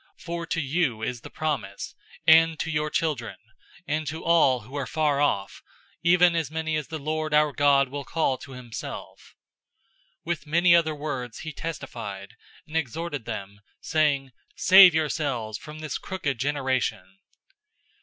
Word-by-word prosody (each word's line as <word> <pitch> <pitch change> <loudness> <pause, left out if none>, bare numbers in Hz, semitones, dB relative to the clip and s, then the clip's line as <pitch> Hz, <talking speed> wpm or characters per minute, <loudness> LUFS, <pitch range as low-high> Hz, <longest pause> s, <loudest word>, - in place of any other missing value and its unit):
002:039 - - -21
For 170 -1 -4
to 165 - -1
you 140 -5 0
is 120 0 -3
the - - -10
promise, 135 -11 -3 0.3
and 165 0 +6
to 160 - -2
your 150 -1 0
children, 125 -11 -2 0.5
and 155 0 -1
to 160 +3 -5
all 145 -7 +4
who 120 +6 -15
are 140 -2 -2
far 150 -3 +1
off, 100 -9 0 0.4
even 175 0 +5
as 165 -4 -1
many 160 0 -2
as 150 -4 -2
the 160 +1 -5
Lord 155 +1 -2
our 150 -1 +4
God 140 -1 +4
will 140 +1 -5
call 135 -1 0
to 135 - -11
himself." 125 -3 -8 0.9
002:040 - - -53
With 165 -4 -3
many 170 +3 +5
other 160 -2 +2
words 135 -5 -5
he 155 -1 -6
testified, 115 -11 -6 0.3
and 155 - -11
exhorted 155 -2 -3
them, 100 -2 -6 0.2
saying, 145 -4 +1 0.2
"Save 185 -2 +8
yourselves 140 -9 -1
from 150 0 -10
this 155 -3 -4
crooked 150 -10 -3
generation!" 130 -9 -1
150 Hz, 155 wpm, -26 LUFS, 125-160 Hz, 0.9 s, Save